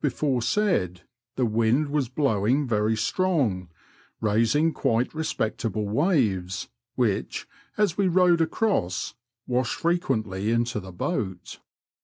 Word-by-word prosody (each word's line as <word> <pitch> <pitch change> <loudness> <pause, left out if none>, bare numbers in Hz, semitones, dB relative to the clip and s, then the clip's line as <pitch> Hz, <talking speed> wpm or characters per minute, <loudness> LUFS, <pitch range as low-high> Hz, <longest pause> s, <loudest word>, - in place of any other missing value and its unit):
95 140 -4 0
before 135 -5 +1
said, 115 - 0 0.3
the 130 - +1
wind 115 +6 +2
was 140 -4 0
blowing 130 0 +1
very 110 -1 +1
strong, 130 - 0 0.5
raising 115 +9 +2
quite 115 +2 0
respectable 110 -8 -2
waves, 105 - 0 0.3
which, 115 -6 -1 0.3
as 205 -3 +1
we 195 - +3
rowed 180 -1 +4
across, 160 - 0 0.3
washed 125 -1 0
fre 170 - +1
quently 110 - -1
into 115 -1 0
the 95 -1 -9
boat. 95 +1 -4
120 Hz, 120 wpm, -25 LUFS, 105-155 Hz, 0.5 s, rowed